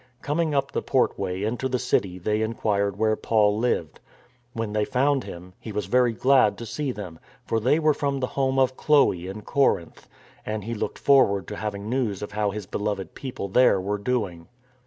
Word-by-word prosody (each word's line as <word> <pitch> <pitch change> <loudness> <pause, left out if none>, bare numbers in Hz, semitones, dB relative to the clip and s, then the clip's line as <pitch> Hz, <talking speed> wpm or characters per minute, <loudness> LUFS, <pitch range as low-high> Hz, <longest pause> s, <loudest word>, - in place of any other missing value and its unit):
Coming 155 0 0
up 135 0 0
the - - -1
portway 90 +2 0
into 120 +5 -1
the 130 - 0
city 100 -7 0
they 105 +4 -1
inquired 100 -3 0
where 110 0 +2
Paul 105 -1 +2
lived. 110 -10 -1 0.5
When 115 -2 -3
they 105 0 +1
found 135 +3 +1
him, 90 +1 -10
he 110 - -8
was 105 -2 -2
very 125 +4 +3
glad 125 -4 +3
to 115 - -7
see 130 +5 -3
them, 90 -8 -8 0.3
for 115 - 0
they 130 +7 +3
were 155 -1 +3
from 140 -1 -1
the 130 - 0
home 135 -1 0
of 130 -1 +3
Chloe 135 - +3
in 100 +3 -7
Corinth, 135 -12 0 0.3
and 110 -1 -4
he 115 +3 -4
looked 105 - -3
forward 100 - +3
to - - -5
having 100 0 -4
news 115 -5 -1
of 105 - -6
how 105 0 0
his 105 0 -5
beloved 100 0 -3
people 130 -7 -6
there 100 0 +4
were 100 +2 -2
doing. 100 -7 -2
110 Hz, 195 wpm, -25 LUFS, 100-130 Hz, 0.5 s, there